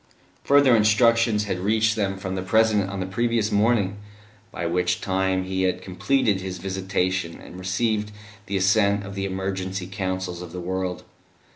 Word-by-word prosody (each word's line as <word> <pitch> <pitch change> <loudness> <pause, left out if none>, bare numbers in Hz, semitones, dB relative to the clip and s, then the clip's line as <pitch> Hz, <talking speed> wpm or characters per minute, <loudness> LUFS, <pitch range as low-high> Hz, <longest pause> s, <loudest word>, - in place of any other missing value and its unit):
Further 140 -3 +5
instructions 115 0 +3
had 95 -3 -3
reached 110 +3 +2
them 100 -3 -1
from 95 -1 -5
the 95 - -2
President 105 0 +2
on 100 -1 -4
the - - -2
previous 115 +2 0
morning, 105 -2 +2 0.5
by 85 - -4
which 90 +1 0
time 95 -1 0
He 95 0 -2
had 90 0 0
completed 105 +1 +1
His 95 -1 -5
visitation, 95 -2 -2
and 90 - -11
received 105 +3 -1 0.4
the 100 0 -1
assent 100 +1 +3
of 100 - -7
the 100 0 -3
Emergency 95 -1 -3
Councils 95 -1 -4
of 90 -1 -9
the 90 - -5
world. 90 0 -3
95 Hz, 160 wpm, -24 LUFS, 95-105 Hz, 0.5 s, Further